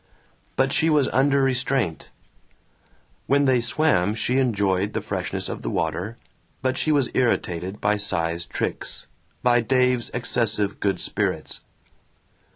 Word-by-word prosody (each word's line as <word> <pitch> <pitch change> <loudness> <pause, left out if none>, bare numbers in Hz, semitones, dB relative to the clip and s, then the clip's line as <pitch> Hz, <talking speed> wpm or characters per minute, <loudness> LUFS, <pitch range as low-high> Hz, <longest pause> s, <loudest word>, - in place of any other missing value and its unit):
But 135 +1 +2
she 160 +1 +3
was 150 -4 +3
under 140 +1 +3
restraint. 130 - 0 1.2
When 140 +1 +3
they 130 -2 +4
swam 115 - +2
she 125 +4 +1
enjoyed 100 -5 +1
the - - -1
freshness - - -3
of - - -5
the - - -3
water 90 +8 -2 0.5
but 130 0 +1
she 155 - 0
was 140 -5 +2
irritated 95 -6 0
by 105 +1 +1
Cy's 85 -4 -2
tricks, - - -3 0.4
by 120 -1 +4
Dave's 125 0 +1
excessive 115 -4 0
good 100 -1 0
spirits. - - -2
120 Hz, 130 wpm, -24 LUFS, 100-130 Hz, 1.2 s, they